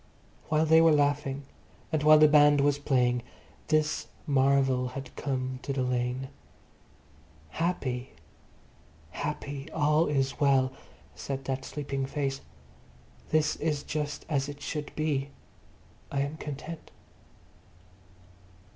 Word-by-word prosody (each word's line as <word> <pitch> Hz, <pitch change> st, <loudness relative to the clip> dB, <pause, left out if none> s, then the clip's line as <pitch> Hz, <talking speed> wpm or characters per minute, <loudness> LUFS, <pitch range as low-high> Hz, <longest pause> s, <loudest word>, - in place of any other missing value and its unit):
While 155 Hz, +1 st, +3 dB
they 160 Hz, +1 st, +6 dB
were 165 Hz, 0 st, +6 dB
laughing 145 Hz, -1 st, +1 dB, 0.5 s
and 155 Hz, -2 st, +1 dB
while 155 Hz, +1 st, +7 dB
the 155 Hz, 0 st, +7 dB
band 145 Hz, -1 st, +6 dB
was 145 Hz, 0 st, +2 dB
playing, 125 Hz, -4 st, +2 dB, 0.5 s
this 155 Hz, 0 st, +1 dB, 0.2 s
marvel 135 Hz, -2 st, +2 dB
had 135 Hz, +2 st, -8 dB
come 130 Hz, -2 st, -3 dB
to 140 Hz, -, -3 dB
the 130 Hz, -1 st, 0 dB
lane. 125 Hz, +1 st, -1 dB, 1.2 s
Happy... 130 Hz, -, -2 dB, 1.0 s
happy.... 145 Hz, -, -5 dB
All 155 Hz, +1 st, +2 dB
is 135 Hz, -2 st, 0 dB
well, 135 Hz, -2 st, +3 dB, 0.4 s
said 135 Hz, -1 st, -5 dB
that 130 Hz, 0 st, -3 dB
sleeping 140 Hz, -2 st, -3 dB
face. 135 Hz, -1 st, -2 dB, 0.9 s
This 155 Hz, -1 st, +2 dB
is 150 Hz, -2 st, -1 dB
just 150 Hz, -1 st, -4 dB
as 140 Hz, -3 st, 0 dB
it 145 Hz, 0 st, -8 dB
should 150 Hz, 0 st, -4 dB
be. 145 Hz, -3 st, -1 dB, 0.8 s
I 140 Hz, -, 0 dB
am 145 Hz, +3 st, -3 dB
content. 155 Hz, +2 st, -7 dB
140 Hz, 115 wpm, -29 LUFS, 135-150 Hz, 1.2 s, while